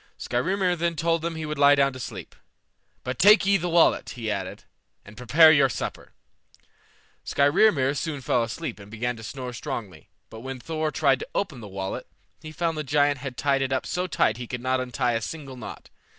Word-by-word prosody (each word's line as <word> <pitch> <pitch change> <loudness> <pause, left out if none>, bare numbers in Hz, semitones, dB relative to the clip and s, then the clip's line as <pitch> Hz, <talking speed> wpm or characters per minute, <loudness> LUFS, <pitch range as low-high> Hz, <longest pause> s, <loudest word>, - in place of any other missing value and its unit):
Skrymir 180 +8 0
then 170 0 -1
told 165 +1 0
them 165 0 -3
he 160 -1 -4
would 150 -1 -4
lie 145 0 +7
down 140 -1 +2
to 130 - -9
sleep. 105 -8 -8 0.7
"But 125 0 -4
take 205 +2 +7
ye 200 0 +4
the 175 -1 -3
wallet," 170 0 +3
he 115 -3 -4
added, 95 -2 -5 0.4
"and 105 - -13
prepare 150 +7 +6
your 140 -4 +4
supper." 100 - -6 1.1
Skrymir 140 -1 +3
soon 145 0 -3
fell 125 -1 +1
asleep 120 +4 -4
and 100 0 -12
began 120 +3 -3
to 110 - -10
snore 125 +1 -6
strongly; 105 -4 -7 0.2
but 110 - -9
when 130 +2 -7
Thor 155 +3 -2
tried 135 -3 +2
to - - -6
open 165 -10 -2
the 110 - -9
wallet, 95 -1 -5 0.3
he 155 - -9
found 165 0 -2
the - - -2
giant 145 0 +2
had 130 -1 -7
tied 140 -1 +1
it 135 0 -1
up 130 - -1
so 180 +1 -2
tight 110 - +1
he 120 -1 -7
could 125 - -5
not 130 +1 0
untie 125 -1 -1
a 115 - -1
single 135 +2 -7
knot. 125 - -10
135 Hz, 205 wpm, -25 LUFS, 120-160 Hz, 1.1 s, lie